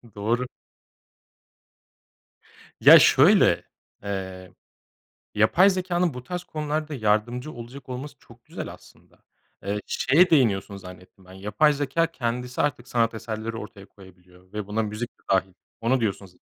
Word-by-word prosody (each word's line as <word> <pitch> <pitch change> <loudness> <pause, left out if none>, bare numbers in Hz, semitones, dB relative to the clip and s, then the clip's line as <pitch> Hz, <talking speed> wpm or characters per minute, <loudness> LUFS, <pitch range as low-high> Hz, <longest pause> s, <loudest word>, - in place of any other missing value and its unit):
Doğru. 115 +5 -1 2.4
Ya, - - +10
şöyle, - - +5 0.4
eee, 95 -2 -6 0.8
yapay 165 - +5
zekânın 180 -4 -1
bu 125 - -7
tarz 180 +4 -5
konularda 155 -1 -3
yardımcı 120 +4 0
olacak 125 +2 -11
olması 130 +3 -7
çok - - -19
güzel - - -7
aslında. - - -19 0.4
Eee, 100 +1 -2
şeye 175 +6 +3
değiniyorsun 105 - +2
zannettim 90 0 -13
ben. 90 - -15
Yapay 105 +10 +2
zekâ 145 +3 0
kendisi 125 -5 -4
artık 130 -4 -1
sanat 115 -1 +1
eserleri 110 0 -5
ortaya 100 -2 -10
koyabiliyor 90 -1 -19
ve 105 -1 -5
buna 105 +2 -1
müzik 110 +3 -4
de - - -35
dâhil. 95 0 +1 0.3
Onu 125 +3 +1
diyorsun 100 -3 -2
z 90 -1 -22
115 Hz, 130 wpm, -25 LUFS, 100-140 Hz, 2.4 s, Ya